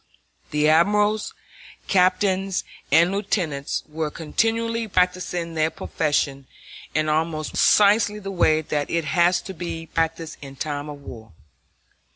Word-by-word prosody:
The 150 Hz, 0 st, +1 dB
admirals, 205 Hz, +7 st, +2 dB, 0.5 s
captains, 190 Hz, 0 st, +2 dB, 0.3 s
and 170 Hz, +5 st, +5 dB
lieutenants 175 Hz, -8 st, -2 dB
were 155 Hz, 0 st, -3 dB
continually 225 Hz, +8 st, -1 dB
practicing 180 Hz, -3 st, 0 dB
their 155 Hz, 0 st, +1 dB
profession 145 Hz, -4 st, -2 dB, 0.5 s
in 155 Hz, 0 st, +1 dB
almost 155 Hz, 0 st, -1 dB
precisely 210 Hz, 0 st, +4 dB
the 195 Hz, -2 st, -6 dB
way 160 Hz, -4 st, +3 dB
that 145 Hz, -1 st, -2 dB
it 170 Hz, -2 st, -1 dB
has 175 Hz, +1 st, +2 dB
to 190 Hz, -, -8 dB
be 165 Hz, -2 st, -5 dB
practiced 165 Hz, 0 st, -2 dB
in 135 Hz, -1 st, -10 dB
time 145 Hz, +1 st, -4 dB
of 145 Hz, -1 st, -9 dB
war. 110 Hz, -7 st, -11 dB
165 Hz, 125 wpm, -23 LUFS, 155-190 Hz, 0.5 s, and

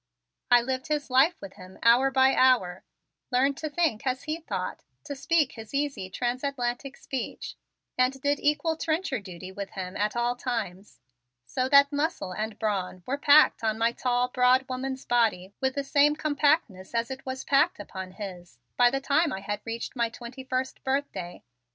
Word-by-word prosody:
I 245 Hz, -1 st, +7 dB
lived 260 Hz, +1 st, -3 dB
his 300 Hz, -3 st, -2 dB
life 280 Hz, +7 st, +4 dB
with 195 Hz, -1 st, -9 dB
him 185 Hz, +1 st, -12 dB
hour 245 Hz, +4 st, +5 dB
by 265 Hz, 0 st, +4 dB
hour, 215 Hz, -9 st, +3 dB, 0.5 s
learned 270 Hz, +3 st, +2 dB
to 310 Hz, -, -4 dB
think 295 Hz, -7 st, 0 dB
as 255 Hz, 0 st, -1 dB
he 315 Hz, +2 st, -3 dB
thought, 325 Hz, -, -5 dB, 0.2 s
to 290 Hz, -1 st, -6 dB
speak 300 Hz, +1 st, +1 dB
his 225 Hz, +4 st, -9 dB
easy 280 Hz, -9 st, -2 dB
transatlantic 255 Hz, +4 st, -3 dB
speech, 265 Hz, -4 st, -5 dB, 0.5 s
and 255 Hz, +1 st, +2 dB
did 285 Hz, +1 st, 0 dB
equal 305 Hz, +2 st, +1 dB
trencher 315 Hz, -5 st, -1 dB
duty 185 Hz, -2 st, -9 dB
with 195 Hz, 0 st, -6 dB
him 185 Hz, 0 st, -6 dB
at 210 Hz, +2 st, -1 dB
all 240 Hz, +1 st, 0 dB
times, 210 Hz, -6 st, -5 dB, 0.4 s
so 255 Hz, -, -2 dB
that 280 Hz, +1 st, +6 dB
muscle 290 Hz, -, -1 dB
and 215 Hz, +1 st, -4 dB
brawn 190 Hz, -4 st, -2 dB
were 265 Hz, -, -1 dB
packed 290 Hz, -3 st, +5 dB
on 220 Hz, -1 st, 0 dB
my 230 Hz, +1 st, +2 dB
tall, 245 Hz, 0 st, 0 dB
broad 255 Hz, +1 st, +3 dB
woman's 260 Hz, +1 st, -4 dB
body 215 Hz, -6 st, +1 dB
with 265 Hz, 0 st, 0 dB
the 280 Hz, -, -1 dB
same 290 Hz, +2 st, +3 dB
compactness 290 Hz, -, 0 dB
as 230 Hz, +2 st, 0 dB
it 265 Hz, 0 st, -7 dB
was 260 Hz, 0 st, -5 dB
packed 285 Hz, +2 st, +2 dB
upon 190 Hz, -2 st, -7 dB
his, 180 Hz, -, -9 dB, 0.2 s
by 245 Hz, -1 st, +6 dB
the 270 Hz, +2 st, -2 dB
time 295 Hz, +4 st, +2 dB
I 190 Hz, -, -4 dB
had 205 Hz, +1 st, -4 dB
reached 230 Hz, +3 st, -5 dB
my 235 Hz, -2 st, +1 dB
twenty 240 Hz, +3 st, -9 dB
first 260 Hz, 0 st, -3 dB
birthday. 265 Hz, -10 st, -3 dB
255 Hz, 175 wpm, -27 LUFS, 215-280 Hz, 0.5 s, I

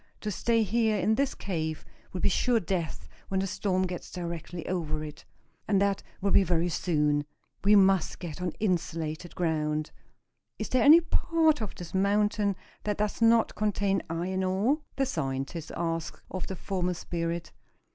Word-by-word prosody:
To 210 Hz, -, -2 dB
stay 230 Hz, +2 st, +2 dB
here 220 Hz, +1 st, +2 dB
in 215 Hz, -, +2 dB
this 275 Hz, +4 st, +1 dB
cave 160 Hz, -5 st, -3 dB, 0.3 s
will 185 Hz, -, -4 dB
be -, -, +3 dB
sure 235 Hz, +4 st, +2 dB
death 175 Hz, -4 st, -3 dB, 0.2 s
when 190 Hz, -, 0 dB
the 190 Hz, -, 0 dB
storm 190 Hz, -1 st, 0 dB
gets 180 Hz, -2 st, -4 dB
directly 170 Hz, -1 st, -5 dB
over 155 Hz, -4 st, -2 dB
it. 150 Hz, -1 st, -9 dB, 0.4 s
And 200 Hz, -2 st, +3 dB
that 200 Hz, -1 st, +1 dB, 0.2 s
will 200 Hz, 0 st, +1 dB
be 195 Hz, -, +6 dB
very 175 Hz, -1 st, +1 dB
soon. 150 Hz, -3 st, +1 dB, 0.4 s
We 205 Hz, +1 st, +6 dB
must 195 Hz, -3 st, +4 dB
get 175 Hz, -1 st, -7 dB
on 180 Hz, -, 0 dB
insulated 170 Hz, -4 st, -2 dB
ground. 155 Hz, -3 st, -1 dB, 0.7 s
Is -, -, -4 dB
there 255 Hz, -, +3 dB
any 315 Hz, +4 st, +9 dB
part 320 Hz, -3 st, +2 dB
of 215 Hz, -, -4 dB
this 175 Hz, -2 st, -9 dB
mountain 205 Hz, +1 st, +2 dB, 0.3 s
that 210 Hz, -1 st, -1 dB
does 210 Hz, +2 st, -1 dB
not 230 Hz, 0 st, +5 dB
contain 200 Hz, -2 st, +1 dB
iron 180 Hz, +3 st, -1 dB
ore?" 200 Hz, +11 st, +2 dB, 0.2 s
the 270 Hz, -, +1 dB
scientist 150 Hz, -, -3 dB
asked 165 Hz, -1 st, -3 dB
of 185 Hz, -, -4 dB
the 190 Hz, -, -4 dB
former 180 Hz, -1 st, -2 dB
spirit. 170 Hz, 0 st, -3 dB
185 Hz, 165 wpm, -29 LUFS, 165-210 Hz, 0.7 s, any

